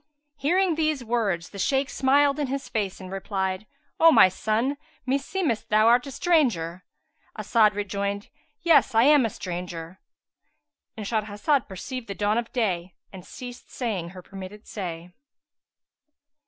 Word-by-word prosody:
Hearing 350 Hz, +6 st, +2 dB
these 310 Hz, -4 st, 0 dB
words 215 Hz, -8 st, -1 dB
the 200 Hz, -, -9 dB
Shaykh 270 Hz, +6 st, +1 dB
smiled 280 Hz, +2 st, +3 dB
in 290 Hz, -, 0 dB
his 275 Hz, +1 st, -4 dB
face 200 Hz, -4 st, -2 dB
and 185 Hz, -1 st, -9 dB
replied, 195 Hz, 0 st, -3 dB, 0.3 s
"O 330 Hz, 0 st, +8 dB
my 225 Hz, -9 st, +7 dB
son, 220 Hz, +8 st, -1 dB, 0.3 s
meseemeth 275 Hz, -, -1 dB
thou 215 Hz, +1 st, +4 dB
art 245 Hz, +4 st, +4 dB
a -, -, -6 dB
stranger?" 230 Hz, -, +1 dB, 0.5 s
As'ad 215 Hz, -3 st, +3 dB
rejoined, 200 Hz, 0 st, -3 dB, 0.3 s
"Yes, 335 Hz, -8 st, +4 dB
I 225 Hz, -, +6 dB
am 285 Hz, -3 st, +6 dB
a -, -, -5 dB
stranger."—And 180 Hz, +4 st, -10 dB
Shahrazad 220 Hz, +6 st, 0 dB
perceived 230 Hz, +6 st, -6 dB
the 200 Hz, -, -5 dB
dawn 210 Hz, +3 st, +1 dB
of 235 Hz, -, -6 dB
day 185 Hz, -7 st, -1 dB, 0.2 s
and 185 Hz, -2 st, -9 dB
ceased 245 Hz, +4 st, -10 dB
saying 205 Hz, -9 st, -3 dB
her 185 Hz, 0 st, -11 dB
permitted 195 Hz, +3 st, -10 dB
say. 175 Hz, -3 st, -6 dB
215 Hz, 140 wpm, -25 LUFS, 190-270 Hz, 0.5 s, O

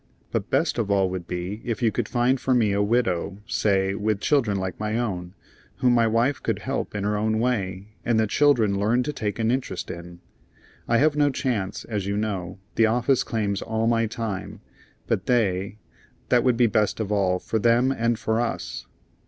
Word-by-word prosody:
But -, -, -2 dB
best -, -, +1 dB
of 110 Hz, -3 st, -1 dB
all 95 Hz, -2 st, +2 dB
would 90 Hz, -2 st, -5 dB
be 90 Hz, +5 st, -4 dB
if 115 Hz, 0 st, -3 dB
you 115 Hz, -, +4 dB
could 120 Hz, -2 st, -2 dB
find 125 Hz, +2 st, +2 dB
for 130 Hz, -1 st, +2 dB
me 110 Hz, -4 st, +3 dB
a 100 Hz, -, +1 dB
widow, 100 Hz, -4 st, 0 dB
say, 100 Hz, -4 st, +1 dB
with 105 Hz, 0 st, -1 dB
children 115 Hz, -6 st, +2 dB
like 95 Hz, -1 st, -4 dB
my 105 Hz, +1 st, -1 dB
own, 95 Hz, -6 st, -3 dB, 0.4 s
whom 125 Hz, -1 st, +3 dB
my 115 Hz, -1 st, +4 dB
wife 115 Hz, +5 st, +1 dB
could 115 Hz, -3 st, -1 dB
help 130 Hz, +1 st, -4 dB
in 100 Hz, -, -2 dB
her 105 Hz, +1 st, 0 dB
own 110 Hz, +1 st, 0 dB
way, 100 Hz, -5 st, -1 dB
and 115 Hz, -2 st, +2 dB
the 110 Hz, -, +3 dB
children 110 Hz, -5 st, +3 dB
learn 115 Hz, +5 st, +2 dB
to 150 Hz, -, -3 dB
take 105 Hz, -6 st, -3 dB
an 115 Hz, 0 st, +1 dB
interest 125 Hz, -8 st, -3 dB
in. 85 Hz, 0 st, -9 dB, 0.7 s
I 115 Hz, -, +3 dB
have 150 Hz, +3 st, +3 dB
no 145 Hz, -1 st, +3 dB
chance, 120 Hz, -8 st, -2 dB
as 105 Hz, -4 st, -3 dB
you 100 Hz, 0 st, -1 dB
know. 100 Hz, -5 st, -3 dB, 0.2 s
The 115 Hz, -, +4 dB
office 125 Hz, +3 st, +2 dB
claims 105 Hz, -4 st, -1 dB
all 110 Hz, 0 st, -1 dB
my 115 Hz, -1 st, +2 dB
time. 110 Hz, -3 st, -5 dB, 0.4 s
But 95 Hz, -, -1 dB
they 100 Hz, -5 st, +1 dB, 0.5 s
that 120 Hz, -1 st, +4 dB
would 125 Hz, -3 st, +2 dB
be 120 Hz, -, +5 dB
best 110 Hz, -1 st, +1 dB
of 105 Hz, -2 st, -2 dB
all, 95 Hz, -3 st, +2 dB
for 110 Hz, +4 st, -2 dB
them 120 Hz, +4 st, +3 dB
and 115 Hz, -3 st, 0 dB
for 110 Hz, +1 st, 0 dB
us." 120 Hz, -, -4 dB
110 Hz, 200 wpm, -24 LUFS, 100-120 Hz, 0.7 s, be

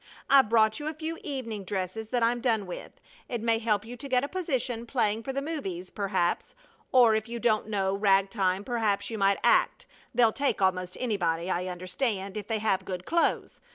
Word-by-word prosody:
I've 270 Hz, -5 st, +6 dB
brought 220 Hz, -1 st, +3 dB
you 295 Hz, -, -5 dB
a 310 Hz, -, -3 dB
few 320 Hz, +1 st, -4 dB
evening 230 Hz, -8 st, -4 dB
dresses 190 Hz, +3 st, -4 dB
that 240 Hz, +1 st, 0 dB
I'm 240 Hz, +1 st, +2 dB
done 225 Hz, -5 st, +1 dB
with. 180 Hz, -, -8 dB, 0.4 s
It 240 Hz, -, -2 dB
may 225 Hz, 0 st, +1 dB
help 215 Hz, -2 st, 0 dB
you 240 Hz, +2 st, -8 dB
to 275 Hz, +4 st, -7 dB
get 250 Hz, 0 st, +2 dB
a -, -, -1 dB
position 260 Hz, -10 st, -2 dB
playing 220 Hz, -4 st, +1 dB
for 270 Hz, -, -4 dB
the 275 Hz, +1 st, -3 dB
movies, 195 Hz, -, -5 dB
perhaps; 190 Hz, -, -1 dB, 0.4 s
or 245 Hz, -3 st, +6 dB
if 220 Hz, +1 st, -1 dB
you 235 Hz, -, -4 dB
don't 215 Hz, -2 st, +1 dB
know 195 Hz, -2 st, 0 dB
rag 195 Hz, -1 st, +3 dB
time, 190 Hz, -2 st, 0 dB
perhaps 210 Hz, -3 st, 0 dB
you 220 Hz, -, -4 dB
might 195 Hz, 0 st, +3 dB
act -, -, +3 dB, 0.3 s
they'll 230 Hz, -2 st, +4 dB
take 280 Hz, -5 st, 0 dB
almost 185 Hz, -1 st, 0 dB
anybody, 180 Hz, -7 st, -1 dB
I 180 Hz, +1 st, -1 dB
understand, 190 Hz, +2 st, -3 dB
if 210 Hz, -1 st, -5 dB
they 225 Hz, -, 0 dB
have 205 Hz, -3 st, 0 dB
good 185 Hz, -1 st, -5 dB
clothes. 335 Hz, 0 st, 0 dB
220 Hz, 200 wpm, -28 LUFS, 195-245 Hz, 0.4 s, I've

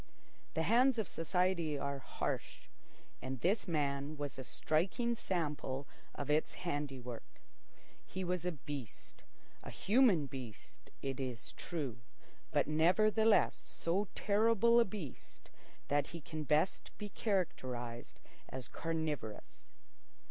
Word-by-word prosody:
The 160 Hz, -, +2 dB
hands 245 Hz, +6 st, +5 dB
of 220 Hz, -5 st, 0 dB
society 170 Hz, -2 st, +1 dB
are 140 Hz, 0 st, -2 dB
harsh, -, -, -3 dB, 0.6 s
and 130 Hz, 0 st, -4 dB
this 200 Hz, +3 st, +2 dB
man 145 Hz, -2 st, 0 dB
was 145 Hz, -2 st, -4 dB
a -, -, -4 dB
striking 185 Hz, -, +1 dB
sample 150 Hz, -, -2 dB, 0.3 s
of 145 Hz, +1 st, -2 dB
its 155 Hz, +1 st, +2 dB
handiwork. 135 Hz, -7 st, -4 dB, 0.6 s
He 190 Hz, -, -4 dB
was 180 Hz, -1 st, -1 dB
a 180 Hz, -, +1 dB
beast—a 140 Hz, -, -9 dB
human 210 Hz, -, +4 dB
beast, 130 Hz, -6 st, -9 dB
it 135 Hz, 0 st, -2 dB
is 125 Hz, -4 st, -4 dB
true, 140 Hz, -9 st, -4 dB, 0.5 s
but 145 Hz, -2 st, +3 dB
nevertheless 215 Hz, +8 st, +4 dB
so 190 Hz, +5 st, -1 dB
terrible 230 Hz, +2 st, +5 dB
a 235 Hz, -, +6 dB
beast 185 Hz, -9 st, -8 dB, 0.4 s
that 145 Hz, -1 st, +2 dB
he 170 Hz, -, -7 dB
can 155 Hz, 0 st, -5 dB
best 150 Hz, +6 st, +2 dB
be 210 Hz, -, -5 dB
characterised 125 Hz, -, -2 dB, 0.3 s
as 130 Hz, -1 st, -4 dB
carnivorous. 155 Hz, -10 st, -3 dB
155 Hz, 115 wpm, -36 LUFS, 140-190 Hz, 0.6 s, a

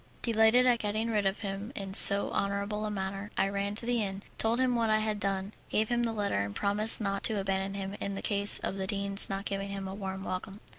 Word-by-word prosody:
Delighted 230 Hz, +2 st, +4 dB
at 245 Hz, -2 st, +3 dB
getting 215 Hz, +2 st, -2 dB
rid 210 Hz, -3 st, +1 dB
of 195 Hz, -, -3 dB
him 200 Hz, +3 st, -5 dB
in 195 Hz, -6 st, -6 dB
so 200 Hz, 0 st, +7 dB
honourable 200 Hz, +2 st, -2 dB
a -, -, -3 dB
manner, 195 Hz, 0 st, -5 dB
I 195 Hz, -, +2 dB
ran 200 Hz, +1 st, -3 dB
to 230 Hz, -, -3 dB
the 240 Hz, -1 st, 0 dB
inn, 195 Hz, -1 st, -4 dB, 0.2 s
told 225 Hz, +2 st, +2 dB
him 255 Hz, -1 st, +2 dB
what 230 Hz, -2 st, 0 dB
I 215 Hz, -, +3 dB
had 215 Hz, -1 st, -2 dB
done, 195 Hz, 0 st, -2 dB, 0.2 s
gave 215 Hz, 0 st, 0 dB
him 240 Hz, 0 st, +1 dB
the 235 Hz, -1 st, 0 dB
letter, 205 Hz, -, -1 dB
and 100 Hz, 0 st, -6 dB
promised 210 Hz, +2 st, +1 dB
not 195 Hz, -1 st, -2 dB
to 220 Hz, -2 st, +4 dB
abandon 195 Hz, 0 st, -2 dB
him 195 Hz, 0 st, -5 dB
in 200 Hz, 0 st, -3 dB
the -, -, -6 dB
case 200 Hz, -1 st, +5 dB
of 195 Hz, -, -4 dB
the 190 Hz, -1 st, -3 dB
dean's 200 Hz, 0 st, 0 dB
not 195 Hz, +1 st, -4 dB
giving 195 Hz, 0 st, -3 dB
him 195 Hz, -1 st, -5 dB
a 190 Hz, -, -6 dB
warm 190 Hz, -1 st, -6 dB
welcome. 195 Hz, +2 st, -6 dB
200 Hz, 245 wpm, -29 LUFS, 195-215 Hz, 0.2 s, so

